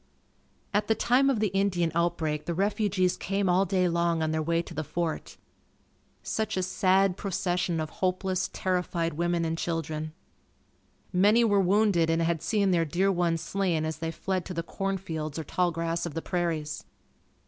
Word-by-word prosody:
At 205 +1 +1
the 220 - +3
time 260 +5 +3
of 255 -5 +1
the 215 -1 +2
Indian 185 -3 +1
outbreak 160 -3 0
the 170 - -1
refugees 200 -1 +1
came 195 +1 -1
all 185 +2 +3
day 185 -1 +2
long 170 -1 +1
on 155 - 0
their 160 0 0
way 165 +2 0
to 170 - -10
the 155 0 -3
fort. 160 +2 -3 0.9
Such 220 -2 -2
a 185 - +1
sad 190 0 +2
procession 180 -3 -1
of 155 -1 -3
hopeless, 185 +1 -1
terrified 180 -3 -1
women 170 +1 0
and 165 0 -2
children. 155 -2 -3 1.0
Many 205 +6 +5
were 205 -3 +4
wounded 190 -3 +3
and 165 +1 +2
had 165 -1 0
seen 200 -3 +1
their 170 -2 +3
dear 180 +6 +1
ones 170 -3 0
slain 180 -5 0
as 160 0 -3
they 165 0 -3
fled 185 +2 -2
to 180 - -6
the 165 - -2
corn 195 +3 -2
fields 160 -5 -5
or 160 - -3
tall 180 +3 +1
grass 165 +1 -2
of 160 - -8
the 165 - -2
prairies. 160 -4 -2
175 Hz, 180 wpm, -28 LUFS, 165-195 Hz, 1.0 s, Many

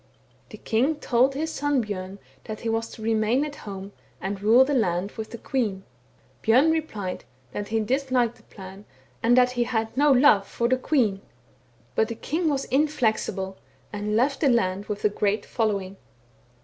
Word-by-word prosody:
The - - -10
king 255 +8 +1
told 265 -1 +2
his 315 +3 -2
son 290 -2 +1
Bjorn 195 -3 -5 0.3
that 215 -2 -6
he 230 - -2
was 225 0 -1
to 220 - -10
remain 225 +5 +2
at 295 -1 -7
home, 195 -1 -8 0.3
and 195 +1 -4
rule 230 +5 +6
the 290 - -1
land 190 -5 0
with 220 -1 -7
the 235 - -7
queen; 215 -6 -2 0.6
Bjorn 255 +8 +4
replied 215 - -3 0.3
that 205 +7 -4
he 225 0 0
disliked 250 0 0
the - - -21
plan, 195 +1 -12 0.4
and 240 +2 +4
that 250 0 +5
he 245 -1 0
had 225 -2 -2
no 290 +2 +4
love 250 -7 +5
for 235 - -1
the 255 +1 +2
queen; 230 -9 +1 0.7
but 220 - +2
the 230 - -5
king 320 +7 -1
was 275 -2 -1
inflexible, 220 -9 0 0.4
and 210 +1 -2
left 270 +5 +2
the 285 - +4
land 200 -5 +1
with 210 -1 -4
a - - +5
great 205 0 -1
following. 200 -4 -2
225 Hz, 175 wpm, -25 LUFS, 205-265 Hz, 0.7 s, rule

